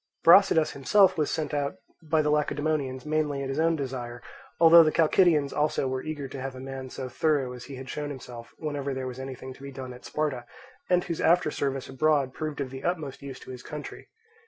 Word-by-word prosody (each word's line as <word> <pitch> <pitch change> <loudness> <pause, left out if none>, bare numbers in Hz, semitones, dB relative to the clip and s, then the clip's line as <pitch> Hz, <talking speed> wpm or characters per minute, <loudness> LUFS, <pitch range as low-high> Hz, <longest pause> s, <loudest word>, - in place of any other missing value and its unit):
Brasidas 165 -3 +6
himself 185 +8 +4
was 150 -3 0
sent 155 -1 -2
out 145 -1 -1 0.3
by 160 -1 +1
the 150 - +1
Lacedaemonians 145 -3 -1
mainly 150 -2 0
at 135 - -4
his 135 +3 -2
own 165 +1 +3
desire, 125 -4 -5 0.4
although 165 0 +9
the 155 -1 +3
Chalcidians 160 -3 +3
also 150 -2 0
were 130 0 -2
eager 150 -3 -5
to 135 0 -7
have 135 0 -5
a - - -8
man 135 0 -7
so 130 0 -6
thorough 135 -1 0
as 125 -1 -9
he 135 - -8
had 130 0 -8
shown 150 +2 -4
himself 120 -4 -9
whenever 145 -3 -3
there 130 0 -4
was 130 0 -6
anything 130 0 -7
to 135 - -18
be 140 0 -7
done 130 -1 -7
at 125 - -13
Sparta, 145 -5 -2 0.4
and 180 -1 +3
whose 170 -2 -4
after 170 -2 +3
service 135 -2 -2
abroad 140 -1 +1
proved 155 -2 -4
of 135 -2 -3
the 135 0 -8
utmost 155 -6 -3
use 135 -2 -8
to - - -10
his 125 -1 -8
country. 150 +2 -8
140 Hz, 215 wpm, -27 LUFS, 130-155 Hz, 0.4 s, although